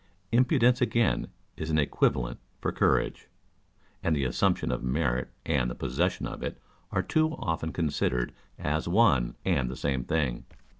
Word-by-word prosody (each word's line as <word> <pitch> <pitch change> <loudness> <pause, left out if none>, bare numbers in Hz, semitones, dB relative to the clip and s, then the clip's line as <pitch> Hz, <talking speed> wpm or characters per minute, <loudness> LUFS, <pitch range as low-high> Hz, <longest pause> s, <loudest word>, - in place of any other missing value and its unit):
Impudence 125 0 +4
again 120 -2 +2 0.3
is 80 - -4
an 80 - +2
equivalent 65 -4 +1 0.2
for - - -1
courage; - - +1 0.7
and 80 - +1
the 70 - 0
assumption 60 -1 +1
of 60 - -2
merit 65 -1 0 0.2
and 60 -1 +1
the - - -5
possession 75 +10 -1
of - - -6
it - - -4 0.3
are - - +1
too 155 0 +1
often 80 -1 -2
considered 70 -6 0 0.2
as 75 +2 -1
one 85 - +3
and 65 -3 +1
the 65 - -5
same 65 -3 -1
thing. 70 -3 -1
75 Hz, 150 wpm, -28 LUFS, 65-90 Hz, 0.7 s, Impudence